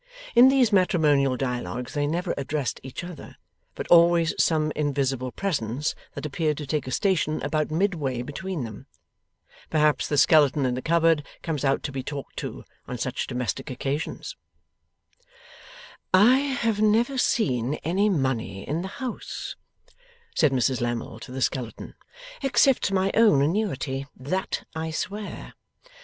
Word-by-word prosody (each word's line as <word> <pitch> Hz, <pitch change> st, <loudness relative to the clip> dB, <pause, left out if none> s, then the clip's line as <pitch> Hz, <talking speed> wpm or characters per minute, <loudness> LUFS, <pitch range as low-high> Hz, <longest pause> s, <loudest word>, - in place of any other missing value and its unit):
In 250 Hz, +2 st, +8 dB
these 260 Hz, -5 st, +3 dB
matrimonial 150 Hz, -8 st, +3 dB
dialogues 125 Hz, -2 st, -3 dB
they 145 Hz, -1 st, 0 dB
never 170 Hz, +3 st, -1 dB
addressed 140 Hz, -1 st, -2 dB
each 130 Hz, +5 st, -7 dB
other, 175 Hz, -3 st, -9 dB, 0.4 s
but -, -, -5 dB
always 170 Hz, -1 st, +5 dB
some 155 Hz, -2 st, +1 dB
invisible 135 Hz, -3 st, -1 dB
presence 145 Hz, -, -2 dB, 0.2 s
that -, -, -5 dB
appeared 150 Hz, 0 st, -1 dB
to 150 Hz, -, -5 dB
take 145 Hz, 0 st, -2 dB
a -, -, -4 dB
station 170 Hz, -5 st, +1 dB
about 155 Hz, +1 st, 0 dB
midway 155 Hz, -8 st, -1 dB
between 170 Hz, +3 st, -4 dB
them. 110 Hz, -3 st, -9 dB, 0.8 s
Perhaps 150 Hz, -1 st, +2 dB
the 145 Hz, -, -1 dB
skeleton 145 Hz, -2 st, +5 dB
in 125 Hz, -, +1 dB
the 130 Hz, -, -3 dB
cupboard 165 Hz, -1 st, +3 dB, 0.2 s
comes 155 Hz, -4 st, -2 dB
out 135 Hz, -1 st, +1 dB
to 140 Hz, -, -3 dB
be 135 Hz, -1 st, -4 dB
talked 140 Hz, +1 st, -7 dB
to, -, -, -6 dB, 0.2 s
on 125 Hz, -, -4 dB
such 130 Hz, +2 st, -3 dB
domestic 125 Hz, +1 st, -3 dB
occasions? 135 Hz, +4 st, -4 dB, 1.8 s
'I 210 Hz, +7 st, +7 dB, 0.3 s
have 225 Hz, -3 st, +1 dB
never 230 Hz, +5 st, +3 dB
seen 130 Hz, -, +1 dB
any 195 Hz, +6 st, +2 dB
money 130 Hz, -, -1 dB
in 155 Hz, +4 st, -1 dB
the 190 Hz, -, -4 dB, 0.2 s
house,' 250 Hz, -, -5 dB, 0.8 s
said 155 Hz, -4 st, +4 dB
Mrs 130 Hz, -1 st, +1 dB
Lammle 120 Hz, -1 st, -3 dB
to 120 Hz, -, -10 dB
the 130 Hz, 0 st, -2 dB
skeleton, 125 Hz, -4 st, -3 dB, 0.5 s
'except 270 Hz, -4 st, +3 dB
my 190 Hz, 0 st, +1 dB
own 215 Hz, -12 st, +5 dB
annuity. 145 Hz, -6 st, -1 dB
That 185 Hz, +9 st, -2 dB
I 160 Hz, 0 st, -3 dB
swear. 205 Hz, +6 st, -5 dB
150 Hz, 145 wpm, -25 LUFS, 130-180 Hz, 1.8 s, In